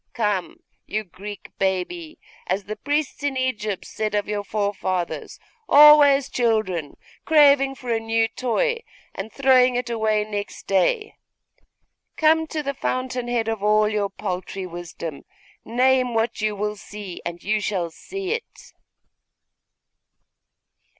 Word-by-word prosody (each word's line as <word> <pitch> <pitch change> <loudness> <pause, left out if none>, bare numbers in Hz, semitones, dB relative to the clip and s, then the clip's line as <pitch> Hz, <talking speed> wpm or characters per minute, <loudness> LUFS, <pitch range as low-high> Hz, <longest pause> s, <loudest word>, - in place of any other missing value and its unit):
Come, 210 -6 -1 0.3
you 215 +1 -2
Greek 200 +2 -10
baby 195 - -2 0.3
as 190 +3 -1
the 215 +2 -5
priests 290 +7 -2
in 285 -2 -1
Egypt 215 -6 -2
said 215 -1 -3
of 205 - 0
your 205 -1 -2
forefathers, 200 -4 -2 0.3
always 290 -2 +8
children, 215 - 0 0.3
craving 280 -3 +5
for 250 -2 -5
a 225 - +1
new 225 0 +1
toy, 360 - 0 0.3
and 195 +3 -6
throwing 255 -2 +4
it 245 -1 -2
away 220 -2 +1
next 205 -1 -6
day 425 - +1 1.0
come 320 +1 +4
to 310 -1 -3
the 280 0 -2
fountainhead 250 -3 -2
of 225 -2 -2
all 210 +1 +4
your 210 -2 0
paltry 190 -1 -5
wisdom! 170 -4 -7 0.4
Name 255 0 +2
what 225 0 0
you 215 -1 0
will 210 +1 -2
see, 200 -3 -8
and 170 0 -6
you 215 +1 0
shall 185 -5 -2
see 390 - -6
it! 465 0 -6
220 Hz, 130 wpm, -23 LUFS, 200-265 Hz, 1.0 s, always